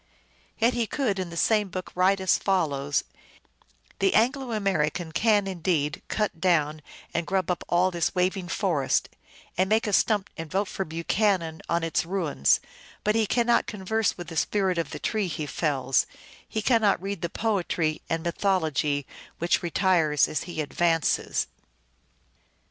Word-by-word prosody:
Yet 235 +2 +3
he 235 -2 0
could 220 -9 -1
in 185 -2 -3
the 170 - -8
same 210 +3 +2
book 185 0 -6
write 190 +2 +3
as 190 -1 +3
follows: 145 -7 0 1.0
"The 390 - +2
Anglo 255 +2 +2
American 175 -6 0
can 205 +5 +3
indeed 170 -5 -1
cut 210 -6 -2
down 155 -4 +2 0.3
and 170 -1 -1
grub 190 -2 0
up 175 - -3
all 180 +2 +3
this 170 +2 -1
waving 185 0 0
forest, 165 -6 0 0.5
and 190 +1 +3
make 220 +1 +3
a 210 - -2
stump 205 -1 +2
and 165 -2 -6
vote 195 +4 0
for 190 - -3
Buchanati 165 0 0
on 170 0 +1
its 165 -1 0
ruins; 165 - +1 0.4
but 210 - +2
he 220 -1 +2
cannot 235 +1 +2
converse 215 +1 -1
with 175 -2 -7
the 165 - -6
spirit 190 -3 +1
of 165 - -2
the - - -6
tretj; 205 -7 -1
he 155 -1 -3
fells, 135 -3 0 0.4
he 220 - -2
cannot 220 -5 +3
read 195 -1 -4
the 170 - -2
poetry 175 -7 -1
and 165 0 -1
mythology 160 -6 0 0.3
which 170 +1 +1
retiresi 170 -4 +2
as 155 - -2
he 170 -3 -4
advances." 165 +1 +1
180 Hz, 155 wpm, -26 LUFS, 160-205 Hz, 1.0 s, Yet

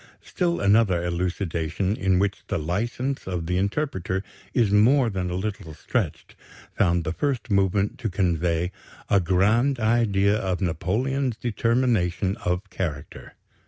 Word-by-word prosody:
Still 175 -2 -1
another 100 -4 +3
elucidation, 90 +1 -1
in 95 -4 +1
which 100 +1 0
the - - -1
license 115 - -2
of 90 -3 -3
the 90 +2 0
interpreter 95 - -1 0.3
is 115 -4 +2
more 115 +4 +4
than 95 -2 -2
a 90 - -3
little 95 -5 -4
stretched, - - -3 0.4
found 85 -3 +2
the 80 - -2
first 130 -1 -2
movement 100 +1 +1
to 115 -4 -2
convey 85 -2 0 0.4
"a 100 - +6
grand 105 +9 +2
idea 110 -3 +2
of 95 -4 -1
Napoleon's 115 - -1
determination 115 -6 +1
of 90 -1 -2
character." 75 -7 -5
100 Hz, 130 wpm, -25 LUFS, 90-115 Hz, 0.4 s, a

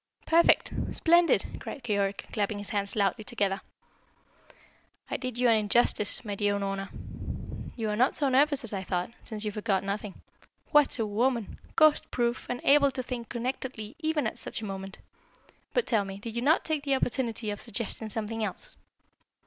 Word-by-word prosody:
"Perfect! 335 +1 +4 0.2
Splendid!" 340 +1 +4
cried 275 - -7
Keyork, 200 -3 -1
clapping 205 -1 0
his 205 -1 -5
hands 200 -1 -1
loudly 200 0 +1
together. 200 -4 -1 1.5
"I - - 0
did 255 -2 -4
you 250 0 +3
an 230 - +6
injustice, 210 +1 +3
my 205 - -3
dear 205 0 +1
Unorna. 195 -1 -2 0.9
You 225 -3 -2
are - - 0
not 250 +5 +3
so 285 - +2
nervous 280 +1 +4
as 230 - +2
I 195 - -2
thought, 180 +1 -2
since 215 -2 -5
you 210 - -1
forgot 205 -2 0
nothing. 200 0 -4 0.5
What 295 -4 +5
a 225 - 0
woman! 230 +1 0 0.2
Ghost 310 -1 +5
proof, 240 0 -1
and 245 0 -3
able 280 0 +6
to 255 -1 -3
think 240 -2 -5
connectedly 240 -2 -4
even 315 -2 0
at - - -3
such - - -3
a - - -3
moment! 195 -1 -6 0.7
But - - +1
tell 220 -5 +2
me, 195 0 -7
did 225 +3 -7
you 235 - -1
not 300 +6 +3
take 310 -2 0
the 275 -2 +2
opportunity 235 -4 -1
of 205 - -5
suggesting 220 +1 -3
something 220 +1 -3
else?" 200 -4 -4
225 Hz, 175 wpm, -29 LUFS, 205-260 Hz, 1.5 s, an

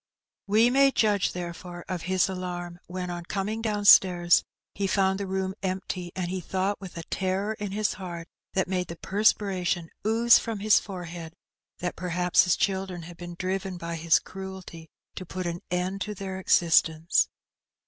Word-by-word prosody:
We 220 +4 +4
may 275 +1 +5
judge, 210 -7 +2
therefore, 175 0 -7
of 180 -2 -3
his 185 +1 +1
alarm 175 -2 -5
when, 180 0 -4
on 175 0 -5
coming 205 +4 -2
downstairs, 195 -5 +5 0.3
he 200 0 -1
fotmd 190 0 +2
the 200 - -3
room 190 0 -2
empty, 185 -2 -3
and 180 -1 -2
he 185 -1 -3
thought, 190 +4 -2
with 185 -3 -9
a 165 - -5
terror 190 +3 -1
in 205 -2 -4
his 210 +1 0
heart 170 -3 -7 0.3
that 190 -1 +1
made 180 -1 -1
the 170 - -7
perspiration 190 -4 +1
ooze 225 +2 +5
from 225 -2 -4
his 210 +1 +4
forehead, 175 -4 -8 0.5
that 175 0 -2
perhaps 180 0 +2
his 180 - +3
children 190 -3 -1
had 175 +1 -10
been 175 0 -8
driven 185 0 -2
by 170 -1 -5
his 165 0 +4
cruelty 190 -4 -8 0.2
to - - -6
put 185 +1 -5
an 170 0 -3
end 180 +2 -2
to 210 +1 -3
their 190 -1 -5
existence. 165 -2 +3
185 Hz, 170 wpm, -27 LUFS, 175-195 Hz, 0.5 s, may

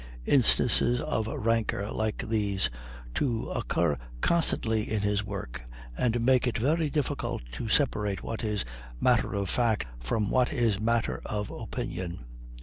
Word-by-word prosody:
Instances 125 -1 +4
of 115 -7 -1
rancor 110 -2 0
like 110 -1 -2
these 100 - +1 0.4
two 120 -6 -1
occur 70 -4 0 0.2
constantly 110 - +1
in 105 -2 0
his 105 0 +1
work, 100 -12 -6 0.3
and 120 - +1
make 130 -1 +4
it 120 - 0
very 150 +6 +1
difficult 145 - -2
to 85 - -5
separate 105 -7 +2
what 115 +1 -4
is 105 - -1 0.3
matter - - +3
of 100 -1 -1
fact 115 - +1 0.2
from 105 - 0
what 125 +1 +3
is 115 -8 +1
matter 115 +1 0
of 105 -1 -3
opinion. 85 -8 -5
110 Hz, 140 wpm, -28 LUFS, 100-120 Hz, 0.4 s, Instances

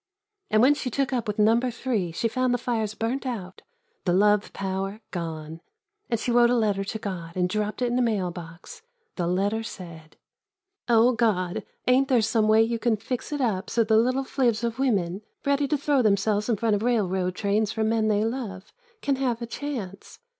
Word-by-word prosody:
And 215 +1 +4
when 275 +3 +6
she 285 -3 -3
took 270 +2 -1
up 240 -2 -1
with 210 - -2
Number 225 +4 +3
Three 230 -7 -2
she 200 +8 -1
found 255 +1 +1
the - - +1
fires 225 -4 -2
burnt 235 +5 -2
out, 205 -8 -5 0.4
the 175 - +2
love 205 +2 +3
power, 195 +1 -3
gone. 160 -2 -5 0.5
And 230 - 0
she 245 - -1
wrote 240 0 +5
a 245 - +3
letter 205 -4 +1
to 210 +3 -4
God 175 -5 -6
and 180 -1 +1
dropped 210 +5 -2
it 245 - +1
in 245 - +1
a - - +3
mail 205 -7 0
box. 175 - -10 0.3
The 175 -2 -1
letter 200 +5 0
said: 170 -7 -10 0.7
God, 225 -6 +2 0.2
ain't 260 +2 +4
there 250 -5 +3
some 215 0 +2
way 220 +1 +6
you 230 0 -1
can 225 -1 +1
fix 250 +6 -5
it 290 -1 -2
up 210 -6 -1
so 230 - +2
the 220 0 +2
little 255 +4 +2
fiivs 240 -4 0
of 235 +1 -2
women, 200 -8 0 0.2
ready 280 0 +2
to 300 - +1
throw 285 -1 +2
themselves 210 0 +1
in 225 - +2
front 220 0 +1
of 205 - -2
railroad 190 -6 0
trains 210 +2 0
for 220 - -1
men 220 0 +1
they 210 0 +2
love, 225 -5 -5 0.3
can 280 -2 +1
have 250 -4 0
a 235 - -4
chance? 230 -7 -6
220 Hz, 200 wpm, -25 LUFS, 195-245 Hz, 0.7 s, when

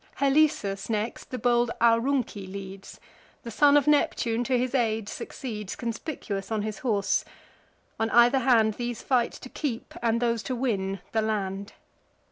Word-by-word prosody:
Halesus, 275 -9 +2
next, 220 +1 -3
the 255 - -4
bold 240 -1 +2
Aurunci 230 -3 +2
leads: 195 0 -9 0.4
The 235 - -6
son 290 +5 +5
of 290 - +3
Neptune 245 -5 +2
to 255 0 +2
his 250 +1 -1
aid 225 -5 0
succeeds, 210 -4 -6
Conspicuous 225 -4 -5
on 215 -2 0
his 215 -1 -4
horse. 205 -6 +1 0.8
On 225 0 +1
either 240 +3 +5
hand, 230 -4 +4
These 240 +1 -4
fight 245 -3 +1
to 255 - -10
keep, 250 -6 -4
and 230 -1 +1
those 235 -2 0
to 255 - -3
win, 195 -7 -1
the 220 - +1
land. 200 -2 -2
230 Hz, 150 wpm, -27 LUFS, 210-255 Hz, 0.8 s, son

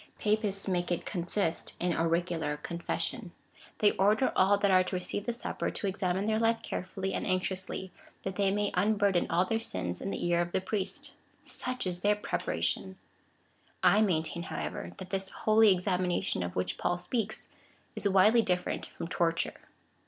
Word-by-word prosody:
Papists 210 -2 0
make 180 -2 0
it 175 - -1
consist 175 -1 -1
in 175 -1 +1
auricular 165 -2 0
confession. 170 +5 -3 0.4
They 205 -1 +5
order 210 +6 +3
all 195 +2 +5
that 200 -1 +2
are 185 0 +6
to 185 - -3
receive 190 +4 -3
the - - +2
Supper, 235 - -3
to - - -4
examine 190 0 0
their 220 0 +1
life 225 0 +2
carefully 190 +1 -3
and - - -2
anxiously, 185 0 -1 0.3
that 190 -1 -3
they 200 0 +2
may 205 +1 0
unburthen 200 -1 +2
all 180 +2 +3
their 225 +4 0
sins 90 - -4
in 195 - -3
the - - -3
ear 175 0 +3
of 175 0 -3
the - - +2
priest. 190 0 -3 0.3
Such 255 -3 -3
is 180 -1 -1
theiy^ 205 +1 +2
preparation! 85 - -1
^ - - -21 0.9
I 210 - +6
maintain, 170 -4 0
however, - - -5
that 185 -2 -9
this 195 -1 -2
holy 215 0 +4
examination 180 - +1
of 90 0 -4
Avliich 90 0 -2
Paul 175 - +1
speaks, 220 +4 -2 0.5
is 200 - +1
widely 210 +5 +6
different 180 -4 -1
from - - -7
torture. 165 -1 -1
190 Hz, 170 wpm, -30 LUFS, 175-205 Hz, 0.9 s, are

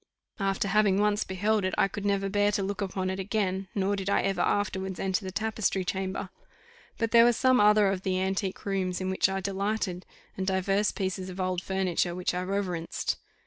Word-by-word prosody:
After 195 0 0
having 200 -1 +3
once 210 0 +2
beheld 205 +3 0
it, 185 - -1
I - - +4
could 205 +1 -6
never 200 -1 +1
bear 205 +1 +2
to 200 - 0
look 195 0 -3
upon 190 -1 -2
it 190 - -4
again, 195 -1 -1
nor 200 0 +1
did 195 0 -3
I - - +2
ever 195 -1 0
afterwards 190 -2 -1
enter 195 +2 0
the 190 - -5
tapestry 215 -2 -1
chamber: 190 +1 -3 0.7
but 230 -1 -1
there 230 0 +8
were 240 0 +5
some 255 +2 +3
other 210 0 +6
of 195 -1 0
the 185 -1 0
antique 190 0 -2
rooms 190 -2 -1
in 185 0 -2
which 190 - +2
I 195 0 -2
delighted, 195 -1 -2 0.3
and 190 -1 -3
divers 195 +2 +1
pieces 190 -1 -3
of 185 +1 -8
old 185 -1 -1
furniture 185 -2 0
which 180 0 -1
I 180 - -1
reverenced. 185 -3 -2
195 Hz, 200 wpm, -28 LUFS, 185-205 Hz, 0.7 s, there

